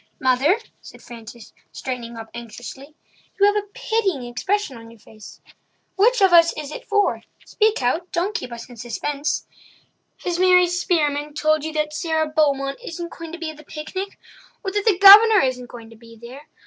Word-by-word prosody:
"Mother," 265 Hz, -, +2 dB, 0.2 s
said -, -, -14 dB
Frances, 230 Hz, -1 st, -12 dB, 0.2 s
straightening 240 Hz, -3 st, -6 dB
up 225 Hz, 0 st, -10 dB
anxiously, 240 Hz, +5 st, -10 dB, 0.4 s
"you 400 Hz, -, +5 dB
have 410 Hz, 0 st, +3 dB
a 415 Hz, -1 st, -2 dB
pitying 420 Hz, -, -2 dB
expression 280 Hz, +7 st, -2 dB
on 230 Hz, 0 st, -12 dB
your 230 Hz, -1 st, -17 dB
face. 215 Hz, 0 st, -15 dB, 0.5 s
Which 460 Hz, +4 st, +3 dB
of 380 Hz, -2 st, +4 dB
us 335 Hz, -1 st, +7 dB
is 300 Hz, -1 st, -6 dB
it -, -, -9 dB
for—speak 420 Hz, -, -1 dB
out—don't 345 Hz, +8 st, -1 dB
keep 340 Hz, -, -5 dB
us 235 Hz, -1 st, -8 dB
in 245 Hz, -2 st, -14 dB
suspense. 280 Hz, +6 st, -3 dB, 0.8 s
Has 350 Hz, -1 st, -2 dB
Mary 365 Hz, -1 st, +5 dB
Spearman 300 Hz, -5 st, -1 dB
told 310 Hz, -1 st, +1 dB
you 315 Hz, -, -4 dB
that 305 Hz, -1 st, -2 dB
Sara 320 Hz, -1 st, -1 dB
Beaumont 280 Hz, -3 st, 0 dB
isn't 340 Hz, 0 st, -7 dB
going 330 Hz, -1 st, -9 dB
to 340 Hz, -, -7 dB
be 330 Hz, -2 st, -5 dB
at 310 Hz, -, -15 dB
the 305 Hz, -, -14 dB
picnic?" 375 Hz, +7 st, -7 dB, 0.5 s
"Or 385 Hz, -, -3 dB
that 410 Hz, +1 st, -2 dB
the 420 Hz, -5 st, +3 dB
Governor 410 Hz, +2 st, +9 dB
isn't 250 Hz, -2 st, -2 dB
going 230 Hz, -2 st, -12 dB
to -, -, -14 dB
be 230 Hz, +1 st, -16 dB
there?" 255 Hz, +5 st, -12 dB
305 Hz, 175 wpm, -21 LUFS, 250-370 Hz, 0.8 s, Governor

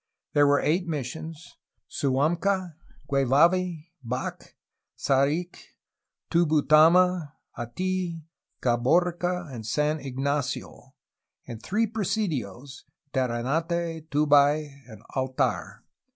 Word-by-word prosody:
There 145 Hz, -1 st, +5 dB
were 145 Hz, 0 st, +4 dB
eight 175 Hz, +4 st, 0 dB
mis 150 Hz, -6 st, -2 dB
sions: 160 Hz, +5 st, -9 dB, 0.3 s
Suamca, 170 Hz, +7 st, 0 dB, 0.3 s
Guevavi, 160 Hz, +5 st, +2 dB
Bac, 125 Hz, +2 st, -5 dB, 0.4 s
Saric, 145 Hz, +6 st, +1 dB, 0.7 s
Tubutama, 165 Hz, +1 st, +4 dB, 0.2 s
Atf, 175 Hz, +7 st, -3 dB, 0.4 s
Caborca, 175 Hz, +6 st, +1 dB
and 115 Hz, -3 st, -7 dB
San 150 Hz, +7 st, 0 dB
Ignacio, 140 Hz, +1 st, -3 dB, 0.5 s
and 115 Hz, -2 st, -8 dB
three 220 Hz, +4 st, 0 dB
presidios, 150 Hz, -, -3 dB, 0.3 s
Terre 120 Hz, -3 st, 0 dB
nate, 165 Hz, +3 st, -2 dB
Tubac, 145 Hz, 0 st, +3 dB, 0.2 s
and 110 Hz, -4 st, -13 dB
Altar. 130 Hz, -1 st, -2 dB
150 Hz, 85 wpm, -26 LUFS, 135-175 Hz, 0.7 s, There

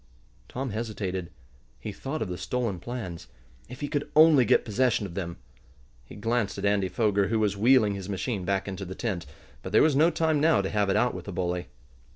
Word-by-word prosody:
Tom 130 Hz, -1 st, -4 dB
hesitated. 100 Hz, -5 st, -4 dB, 0.5 s
He 110 Hz, -, -5 dB
thought 135 Hz, +7 st, -4 dB
of -, -, -5 dB
the 90 Hz, -, -4 dB
stolen 100 Hz, +1 st, -2 dB
plans. 95 Hz, -, -6 dB, 0.4 s
If 125 Hz, +3 st, -10 dB
he 145 Hz, -, -1 dB
could 145 Hz, 0 st, -2 dB
only 155 Hz, -4 st, +7 dB
get -, -, +3 dB
possession 120 Hz, -1 st, +1 dB
of 90 Hz, -, -7 dB
them! 85 Hz, -2 st, -4 dB, 0.7 s
He -, -, -13 dB
glanced 115 Hz, -1 st, -1 dB
at -, -, -3 dB
Andy 100 Hz, -2 st, +2 dB
Foger, 100 Hz, +1 st, +1 dB
who 115 Hz, +3 st, 0 dB
was 105 Hz, -2 st, +1 dB
wheeling 110 Hz, 0 st, +4 dB
his 100 Hz, -1 st, -6 dB
machine 100 Hz, +1 st, -2 dB
back 95 Hz, +2 st, -1 dB
into 95 Hz, 0 st, -5 dB
the 95 Hz, 0 st, -7 dB
tent. 95 Hz, -8 st, -3 dB, 0.3 s
But 95 Hz, -, -7 dB
there -, -, +6 dB
was 155 Hz, -3 st, +3 dB
no 155 Hz, +4 st, +5 dB
time 160 Hz, -3 st, +1 dB
now 130 Hz, -11 st, +4 dB
to 95 Hz, -, -3 dB
have 105 Hz, -1 st, +1 dB
it 95 Hz, -, +2 dB
out 125 Hz, -, +2 dB
with -, -, -7 dB
the 100 Hz, -, -6 dB
bully. 90 Hz, 0 st, -2 dB
105 Hz, 210 wpm, -27 LUFS, 95-125 Hz, 0.7 s, only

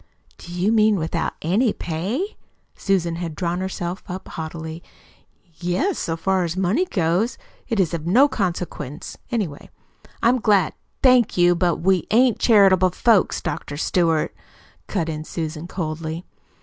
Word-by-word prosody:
"Do 175 Hz, -, -11 dB
you 180 Hz, +4 st, +1 dB
mean 215 Hz, -1 st, +4 dB
without 160 Hz, -2 st, -2 dB
ANY 205 Hz, +8 st, +2 dB
pay?" 200 Hz, -, -3 dB, 0.4 s
Susan 175 Hz, -4 st, 0 dB
had 170 Hz, -3 st, -5 dB
drawn 175 Hz, +2 st, -2 dB
herself 185 Hz, -1 st, -4 dB
up 185 Hz, 0 st, -7 dB
haughtily. 160 Hz, 0 st, -6 dB, 0.7 s
"Yes. 180 Hz, -, -1 dB
So 165 Hz, 0 st, -2 dB
far 190 Hz, +1 st, +1 dB
as 170 Hz, +1 st, -3 dB
money 195 Hz, -, +2 dB
goes 185 Hz, -, 0 dB, 0.3 s
it 230 Hz, -4 st, -1 dB
is 175 Hz, -3 st, +2 dB
of 165 Hz, -1 st, -3 dB
no 250 Hz, +11 st, +6 dB
consequence, 180 Hz, -, -4 dB
anyway. 195 Hz, -12 st, -3 dB, 0.5 s
I'm 245 Hz, +2 st, +4 dB
glad 205 Hz, -6 st, +3 dB, 0.2 s
" -, -, -45 dB
"Thank 250 Hz, -6 st, +5 dB
you, 175 Hz, 0 st, +5 dB
but 175 Hz, -1 st, 0 dB
we 185 Hz, 0 st, +2 dB
ain't 240 Hz, +1 st, +4 dB
charitable 195 Hz, -5 st, +5 dB
folks, 215 Hz, +2 st, +2 dB
Dr. 145 Hz, -, -4 dB
Stewart," 165 Hz, -1 st, +1 dB, 0.5 s
cut 175 Hz, -6 st, -1 dB
in 155 Hz, -1 st, -4 dB
Susan 160 Hz, 0 st, -5 dB
coldly. 160 Hz, -1 st, -4 dB
180 Hz, 145 wpm, -22 LUFS, 165-210 Hz, 0.7 s, no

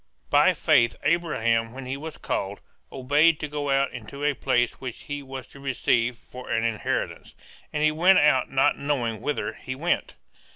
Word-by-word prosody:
By -, -, +5 dB
faith 115 Hz, 0 st, +3 dB
Abraham 115 Hz, -8 st, +1 dB
when 135 Hz, 0 st, -8 dB
he 130 Hz, +1 st, -3 dB
was 155 Hz, +2 st, -7 dB
called, 100 Hz, +1 st, -3 dB, 0.3 s
obeyed 145 Hz, +5 st, +3 dB
to 150 Hz, -, -3 dB
go 145 Hz, -1 st, -4 dB
out 135 Hz, 0 st, +2 dB
into 125 Hz, +5 st, -8 dB
a 150 Hz, 0 st, +2 dB
place 120 Hz, -3 st, 0 dB
which 130 Hz, -3 st, -7 dB
he 145 Hz, 0 st, -5 dB
was 135 Hz, -1 st, -8 dB
to 140 Hz, -, -14 dB
receive 125 Hz, -3 st, 0 dB
for 125 Hz, +1 st, -11 dB
an 115 Hz, 0 st, 0 dB
inheritance; 115 Hz, -3 st, -2 dB, 0.4 s
and 150 Hz, 0 st, -1 dB
he 155 Hz, -, +4 dB
went 180 Hz, +5 st, +5 dB
out 145 Hz, -4 st, +4 dB
not 135 Hz, 0 st, +2 dB
knowing 125 Hz, -6 st, -1 dB
whither 150 Hz, -, -2 dB
he 130 Hz, -, -7 dB
went. 170 Hz, +6 st, -1 dB
135 Hz, 175 wpm, -25 LUFS, 120-150 Hz, 0.4 s, By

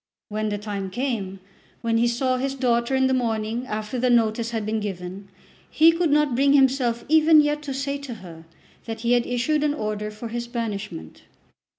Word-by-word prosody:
When 215 Hz, 0 st, -2 dB
the 205 Hz, -, -2 dB
time 200 Hz, -2 st, -5 dB
came, 200 Hz, -4 st, -3 dB, 0.4 s
when 230 Hz, -1 st, +1 dB
he 240 Hz, -, +3 dB
saw 255 Hz, +2 st, 0 dB
his 270 Hz, +1 st, -2 dB
daughter 245 Hz, -1 st, +1 dB
in 265 Hz, 0 st, +3 dB
the 260 Hz, -, +2 dB
morning 230 Hz, 0 st, -1 dB
after 215 Hz, +2 st, -4 dB
the 250 Hz, +1 st, +2 dB
notice 230 Hz, -1 st, +2 dB
had 225 Hz, -3 st, -3 dB
been 220 Hz, +1 st, -1 dB
given, 195 Hz, -1 st, -6 dB, 0.4 s
he 320 Hz, +1 st, +6 dB
could 335 Hz, 0 st, 0 dB
not 295 Hz, -2 st, +3 dB
bring 275 Hz, +3 st, +3 dB
himself 260 Hz, -4 st, +2 dB
even 315 Hz, +1 st, +6 dB
yet 295 Hz, 0 st, +1 dB
to 285 Hz, -2 st, -5 dB
say 280 Hz, +1 st, -2 dB
to 275 Hz, -4 st, -7 dB
her 170 Hz, -5 st, -12 dB, 0.4 s
that 225 Hz, -1 st, -6 dB
he 235 Hz, 0 st, 0 dB
had 245 Hz, -1 st, +3 dB
issued 290 Hz, +5 st, 0 dB
an 295 Hz, -1 st, +1 dB
order 210 Hz, -2 st, -3 dB
for 215 Hz, +2 st, -8 dB
his 235 Hz, +1 st, -4 dB
banishment. 210 Hz, -, -5 dB
235 Hz, 195 wpm, -24 LUFS, 215-270 Hz, 0.4 s, he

